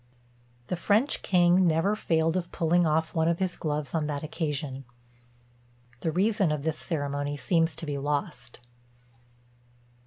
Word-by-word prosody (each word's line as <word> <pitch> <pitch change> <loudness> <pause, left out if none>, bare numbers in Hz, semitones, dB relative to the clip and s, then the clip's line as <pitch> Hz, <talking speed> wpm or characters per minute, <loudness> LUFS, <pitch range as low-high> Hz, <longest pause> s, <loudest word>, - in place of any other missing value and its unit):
The 180 - -2
French 210 - +1
king 180 0 +4
never 165 +6 +2
failed 165 -4 +1
of 175 -2 -2
pulling 170 +1 +2
off 160 +1 0
one 160 -1 +1
of 170 0 +2
his 185 -1 -1
gloves 150 -2 -3
on 155 -3 0
that 145 -1 -3
occasion. 150 -4 -3 1.2
The 160 - -1
reason 195 0 +2
of 150 -2 -2
this 160 0 -2
ceremony 145 -2 -3
seems 165 +1 +1
to - - -6
be 145 -2 -3
lost. 140 -4 -3
160 Hz, 145 wpm, -27 LUFS, 150-175 Hz, 1.2 s, king